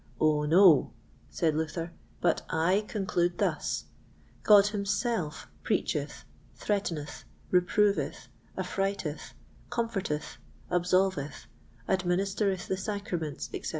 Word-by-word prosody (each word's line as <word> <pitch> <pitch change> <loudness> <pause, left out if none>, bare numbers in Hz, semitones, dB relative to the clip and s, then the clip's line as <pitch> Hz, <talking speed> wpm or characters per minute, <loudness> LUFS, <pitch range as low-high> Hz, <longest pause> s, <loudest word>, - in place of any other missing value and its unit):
Oh, 150 -1 +3
no," 165 -1 +6 0.4
said 160 -3 +1
Luther, 160 +2 -3 0.3
"but - - +2
I 180 +6 +2
conclude 175 -4 0
thus: - - -1 0.6
God 205 -2 +7
himself 205 -4 -1 0.2
preacheth, - - -1 0.3
threateneth, 170 -8 -3 0.3
reproveth, 200 +3 +2 0.3
affrighteth, 195 -6 -3 0.3
comforteth, 195 -10 -2 0.3
absolveth, 180 -3 +1 0.4
administereth 190 +1 0
the 190 - -1
sacraments, 190 -7 -3
etc. - - -4
185 Hz, 85 wpm, -29 LUFS, 160-200 Hz, 0.6 s, God